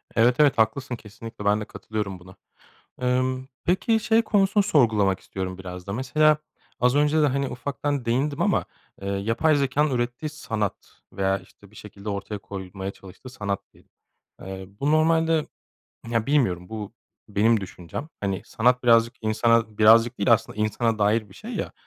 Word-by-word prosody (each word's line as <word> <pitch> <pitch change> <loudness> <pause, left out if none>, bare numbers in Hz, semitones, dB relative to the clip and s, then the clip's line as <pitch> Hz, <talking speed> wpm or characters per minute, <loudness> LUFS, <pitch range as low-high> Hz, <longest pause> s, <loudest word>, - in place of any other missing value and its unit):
Evet, 120 +2 +4
evet. 145 -3 +5
Haklısın, 125 +4 +1
kesinlikle 115 -1 -10
ben 105 +1 +3
de - - -4
katılıyorum 105 -4 -5
buna. 95 +1 -15 0.7
Imm, 130 +1 0 0.2
peki 220 +5 +2
şey 225 +1 +3
konusunu 205 -2 +2
sorgulamak 110 - +3
istiyorum 95 -1 -5
biraz 90 -1 -8
da 100 - -3
mesela 150 +5 +3 0.4
az 125 +2 +3
önce 150 +2 +3
de, 150 - +4
hani, 140 0 0
ufaktan 140 0 -3
değindim 140 +6 0
ama, 200 0 +2 0.4
eee, 100 - -4
yapay 115 +10 +1
zekânın 140 +2 +1
ürettiği 120 +4 -2
sanat 110 -9 -3 0.4
veya 95 0 0
işte 100 +1 -19
bir - - -20
şekilde 105 0 -9
ortaya 100 +1 -4
koyulmaya 95 0 -6
çalıştığı 100 +7 -13
sanat 100 -6 -3
diyeyim. - - -24 0.5
Eee, 95 0 -7
bu 145 - +2
normalde 160 0 +3 0.6
Ya 115 -1 0
bilmiyorum, 105 - +1
bu 110 -1 -6 0.4
benim 110 +2 +3
düşüncem. 90 - -7
Hani, 95 -2 -2
sanat 125 +2 +2
birazcık 115 0 +5
insana 110 0 +2
birazcık 115 +2 +6
değil 100 +4 +4
aslında 110 -1 +1
insana 110 +1 0
dair 105 +1 +2
bir - - -15
şey - - -9
ya - - -3
115 Hz, 160 wpm, -25 LUFS, 100-140 Hz, 0.7 s, birazcık